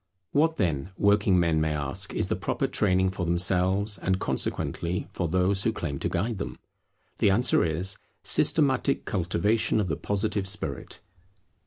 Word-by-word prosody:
What 160 +3 +2
then, 85 - -1
working 100 -2 +3
men 85 -2 +2
may 80 -1 0
ask, 70 -2 -2
is - - 0
the - - -1
proper - - -2
training 95 -2 +1
for 95 -1 -4
themselves, 95 +4 +2
and 95 0 0
consequently 85 -1 -2
for 85 - -2
those 95 +3 +2
who 115 - +2
claim 75 -10 -4
to - - -2
guide 100 +4 -2
them? - - -5 0.6
The - - +4
answer 110 +6 +3
is, 85 +4 0 0.3
systematic 140 -2 +2
cultivation 105 +5 +1
of 100 -4 -1
the 80 - 0
Positive 100 -1 -2
spirit. 100 +1 -4
95 Hz, 155 wpm, -26 LUFS, 85-105 Hz, 0.6 s, The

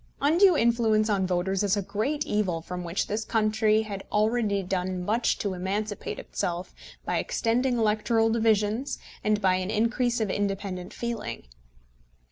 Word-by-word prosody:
Undue 340 +4 +5
influence 225 -3 +2
on 190 -2 +1
voters 185 +1 0
is 205 0 +2
a - - +1
great 255 +11 -2
evil 190 -5 0
from 180 +2 -6
which 170 +2 -1
this 215 +2 -2
country 215 -1 +2
had 200 -3 -6
already 210 -2 +1
done 185 -1 -2
much 225 +4 +1
to 200 -2 -2
emancipate 200 +3 -3
itself 175 +1 -4 0.3
by - - 0
extended 245 +2 0
electoral 225 0 +2
divisions 220 +3 +1 0.3
and 210 0 +2
by 190 -2 +4
an 185 +1 -3
increase 235 +3 +1
of 215 -4 0
independent 195 -2 -3
feeling. 235 -1 -4
215 Hz, 145 wpm, -27 LUFS, 190-230 Hz, 0.3 s, Undue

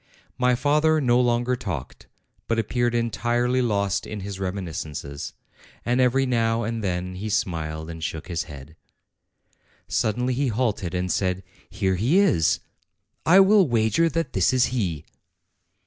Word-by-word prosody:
My 125 0 +3
father 150 +4 +2
no 125 -3 +3
longer 120 +1 +1
talked, 85 - -6 0.4
but 115 - 0
appeared 120 +2 0
entirely 120 +2 +1
lost 100 -5 0
in 105 -2 -6
his 100 0 -6
reminiscences; 80 -7 -5 0.5
and 120 +2 +2
every 130 +2 +3
now 115 -2 +1
and 115 0 -3
then 90 -1 -2
he 100 +4 -5
smiled, 80 -6 -2
and 80 -1 -7
shook 80 0 -4
his 85 -2 -2
head. 70 +2 -11 1.1
Suddenly 125 +4 0
he 135 +2 0
halted 105 -7 -1
and 90 0 -1
said: 95 -1 0 0.3
"Here 95 -1 0
he 125 - +2
is. 160 - +3 0.7
I 185 +4 +8
will 195 -2 +5
wager 115 +7 +2
that 165 +2 -2
this 95 +5 +2
is 125 -1 +4
he." 85 - -2
115 Hz, 145 wpm, -24 LUFS, 90-125 Hz, 1.1 s, I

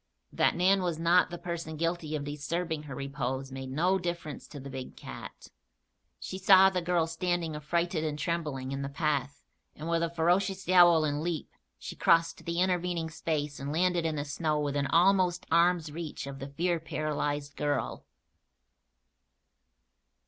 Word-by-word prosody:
That - - +2
Nan 190 +2 +4
was 175 -3 -1
not 170 +3 +4
the 175 - -6
person 170 -3 -5
guilty 165 -1 -1
of 145 - -3
disturbing 150 +3 -3
her 130 - -5
repose 135 -1 -3
made 130 0 -6
no 180 +8 +2
difference 170 -4 -5
to 145 - -9
the 140 0 -8
big 130 -1 -7
cat. - - -10 0.7
She 190 - -6
saw 190 0 +7
the 185 -1 -1
girl 175 -1 +1
standing, 165 -1 -2
affrighted 170 +2 -1
and 150 -2 -2
trembling, 150 -5 -2
in 135 0 -3
the 140 - -3
path 140 -2 -1 0.3
and 155 - -7
with 170 0 +1
a 170 - 0
ferocious 185 +4 +1
yowl 175 -3 +6
and 145 0 -1
leap 170 -1 -3 0.3
she - - -8
crossed 165 0 +3
the 170 +1 -1
intervening 175 -3 0
space 150 -3 -2
and 140 +1 -4
landed 175 +1 +2
in 160 -1 -1
the 145 -1 -3
snow 150 +1 -1
within 145 -1 0
almost 180 +2 +3
arm's 170 -1 +3
reach 155 -2 -6
of 140 0 -7
the 135 +1 -6
fear 170 +4 0
paralyzed 145 -2 -3
girl. 145 -2 -2
165 Hz, 165 wpm, -29 LUFS, 145-175 Hz, 0.7 s, saw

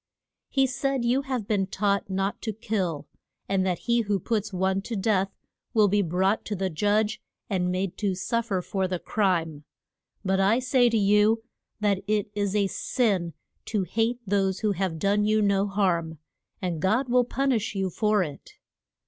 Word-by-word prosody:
He 270 -1 +3
said, 265 -1 -1
you 250 +3 +2
have 255 -6 -3
been 195 -3 +1
taught 200 0 0
not 195 +1 -2
to 220 - -3
kill; 190 -8 -2 0.4
and 190 -1 +1
that 180 -2 0
he 235 0 +1
who 205 -2 0
puts 210 +1 -2
one 190 +1 0
to 230 +3 -5
death 195 -2 +1 0.5
will 215 -2 +6
be 205 +1 +2
brought 190 +4 +1
to 210 - -3
the 190 -1 -2
judge, 210 +5 +1 0.3
and 180 -2 +1
made 185 0 -2
to 200 -3 0
suf 230 +5 -1
fer 190 -4 -1
for 190 0 -1
the 185 0 -2
crime. 165 -7 0 0.6
But 190 0 +2
I 200 +4 +4
say 255 -1 +3
to 230 - +1
you 210 +2 +3 0.4
that 200 -2 +2
it 210 -1 0
is 205 -1 -1
a 205 -1 +3
sin 190 - 0 0.3
to 210 -4 -1
hate 225 +6 0
those 195 -1 0
who 215 - +2
have 190 -3 -2
done 200 +4 +2
you 215 +1 +3
no 200 -1 +2
harm, 175 -5 0 0.5
and 170 -4 -2
God 220 +9 +2
will 250 0 +4
pun 270 +3 0
ish 225 -3 -1
you 190 -1 -1
for 210 +1 +2
it. 145 -4 -9
200 Hz, 180 wpm, -26 LUFS, 190-220 Hz, 0.6 s, will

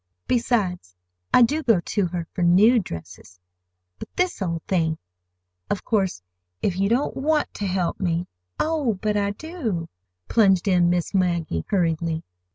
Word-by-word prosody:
Besides, 195 - 0 0.4
I 250 - +7
do 295 +7 +2
go 230 - +3
to 185 +2 -1
her 170 -1 -4
for 180 - -4
new 200 +8 +6
dresses. 90 - -9 0.6
But - - -8
this 360 - 0
old 170 -3 -2
thing—! 160 -4 0 0.7
Of 200 - -2
course, 190 - 0 0.4
if 185 - +1
you 195 0 +2
don't 245 +5 +1
want 300 +3 0
to 205 - -3
help 180 -2 -1
me—" 175 -2 0 0.3
"Oh, 300 -8 +1
but 210 +1 0
I 200 -1 +1
do," 220 - -4 0.4
plunged 195 -5 +3
in 180 -2 +4
Miss 175 +1 0
Maggie 170 - 0
hurriedly. 165 -3 0
190 Hz, 150 wpm, -24 LUFS, 170-230 Hz, 0.7 s, I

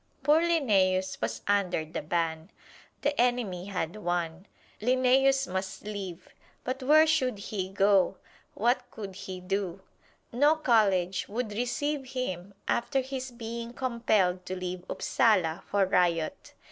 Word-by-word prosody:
Poor 300 +3 +5
Linnæus 195 - +2
was 110 0 -3
under 195 -5 +1
the 160 - -5
ban. 160 +1 -2 0.5
The 290 -2 +2
enemy 235 -8 0
had 185 -1 -3
won: 175 -1 -2 0.3
Linnæus 260 +3 +3
must 190 +1 -4
leave. 195 -4 -6 0.3
But 260 +2 -3
where 305 +4 +6
should 265 -8 +1
he 195 -2 -4
go 195 -1 +3 0.4
what 240 +4 +1
could 200 -3 -7
he 185 -1 -7
do? 190 0 -3 0.5
No 290 +6 +4
college 200 - +2
would 225 +1 -3
receive 265 +4 -2
him 195 -7 -4
after 270 +3 +1
his 260 0 -5
being 235 0 -6
compelled 220 -8 +1
to 185 - -3
leave 180 -1 -5
Upsala 185 -10 +2
for 200 -1 +2
riot. 175 -3 0
205 Hz, 130 wpm, -29 LUFS, 185-255 Hz, 0.5 s, where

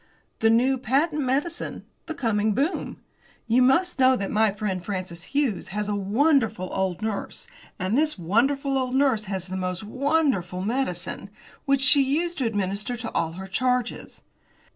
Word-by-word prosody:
"The 225 - +4
new 250 +4 +3
patent 295 +6 +1
medicine 285 +6 -2 0.2
the 320 - -4
coming 215 -5 +1
boom. 290 - -1 0.5
You 235 +3 +4
must 285 +7 +3
know 260 0 +6
that 200 -5 -3
my 220 0 +3
friend 195 -3 -3
Francis 185 -4 -5 0.2
Hughes 250 -11 0
has 210 +2 -3
a 210 - -1
wonderful 215 - +1
old 190 0 -1
nurse, 220 -2 -3 0.3
and 185 +3 -1
this 305 0 +2
wonderful 270 - +1
old 255 0 -2
nurse 265 -6 +2
has 190 -2 -4
the 185 0 -5
most 185 +1 -3
wonderful 255 - 0
medicine, 200 -5 -2 0.4
which 275 -1 +2
she 275 +2 +6
used 315 +5 0
to 255 - +1
administer 205 +2 -2
to 230 -1 -5
all 165 -1 -1
her 190 +3 -7
charges. 250 +4 -2
225 Hz, 160 wpm, -25 LUFS, 195-270 Hz, 0.5 s, know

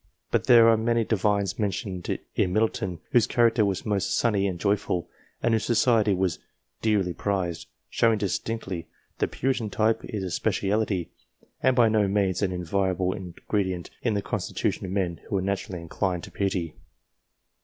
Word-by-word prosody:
But - - +1
there 120 -3 +7
are 115 -1 +6
many 115 +1 +1
Divines 100 -3 0
mentioned 95 -3 -2 0.2
in 90 - +1
Middleton, 95 -5 0
whose 120 -3 +4
character 115 -2 +3
was 100 -2 -1
most 100 -3 0
sunny 100 -4 +2
and 90 -3 -3
joyful, 95 -3 0 0.4
and 120 - +3
whose 110 - +1
society 115 -4 +3
was 90 -3 0 0.4
dearly 100 -5 +1
prized, 90 -3 -2 0.2
showing 115 -1 +2
distinctly 95 -3 -3 0.3
that - - 0
the - - -12
Puritan 125 -4 0
type 110 +2 +1
is 105 -3 -4
a 90 - -4
speciality, 95 -1 0 0.5
and 130 -1 +3
by 120 -2 +5
no 110 -2 +3
means 95 -2 +1
an 100 -2 +1
invariable 95 +1 0
ingredient 95 -1 -3
in 115 -4 0
the 100 - -1
constitution - - -2
of - - -5
men 90 -4 -1
who 100 - 0
are - - 0
naturally 100 -1 -3
inclined 90 +1 -2
to - - -9
piety. 95 -5 -1
100 Hz, 165 wpm, -26 LUFS, 90-110 Hz, 0.5 s, there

